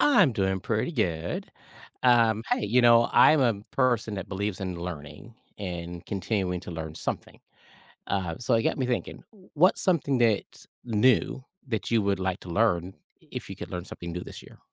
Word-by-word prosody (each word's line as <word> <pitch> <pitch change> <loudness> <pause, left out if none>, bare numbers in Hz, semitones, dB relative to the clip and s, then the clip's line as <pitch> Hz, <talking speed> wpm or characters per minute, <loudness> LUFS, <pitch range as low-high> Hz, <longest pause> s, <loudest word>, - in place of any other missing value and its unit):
I'm 205 - +5
doing 95 -2 0
pretty 110 - -1
good. 85 - -2 0.5
Um, 115 -3 +4
hey, - - +1
you 120 +5 +4
know, 120 0 +6
I'm 155 -1 +6
a 120 -4 +3 0.2
person 120 -5 +1
that 95 0 -6
believes 100 0 -3
in 95 -2 -3
learning 85 +4 -8 0.2
and 85 -3 -6
continuing 95 -3 -2
to 90 - -9
learn 80 -1 -6
something. - - -5 0.7
Uh, 90 -4 -2
so 120 0 +1
it 115 - +3
got - - 0
me 130 - 0
thinking, 125 -1 -3 0.3
what's 175 +5 +4
something 145 -7 +1
that's 115 -4 0 0.2
new 125 +3 +2 0.2
that 110 -5 -2
you 115 -2 +3
would 100 -1 0
like 95 0 -2
to 90 - -10
learn, 95 -2 +1 0.4
if - - -6
you - - -6
could - - -8
learn 90 -1 -4
something 85 -2 -8
new 90 +1 -4
this - - -10
year? - - -16
105 Hz, 180 wpm, -27 LUFS, 90-120 Hz, 0.7 s, know